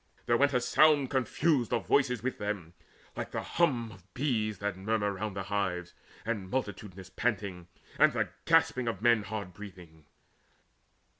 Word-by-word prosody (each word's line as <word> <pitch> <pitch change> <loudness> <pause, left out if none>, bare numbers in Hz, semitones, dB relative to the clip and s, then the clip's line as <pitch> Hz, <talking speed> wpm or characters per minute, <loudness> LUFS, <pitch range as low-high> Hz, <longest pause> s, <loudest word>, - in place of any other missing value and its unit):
There 120 - +3
went 140 +2 +3
A - - +4
sound 145 +1 +4
confused 135 0 +1
of - - 0
voices 125 -5 +2
with 130 0 -2
them, 100 -5 -4 0.4
like - - -4
The - - -4
hum 125 -10 +1
of 95 -1 -17
bees 110 -6 0
that 100 0 -2
murmur 105 +1 -1
round 100 +1 -4
the 95 - -3
hives, 95 -3 -2 0.3
And 105 -5 -3
multitudinous 100 -6 -4
panting, 100 -5 -2 0.3
and - - +6
the - - -1 0.2
gasp - - +4
Of 115 -5 -3
men 120 -2 +5
hard 100 -3 -5
breathing. 90 -6 -12
105 Hz, 155 wpm, -30 LUFS, 95-125 Hz, 0.4 s, and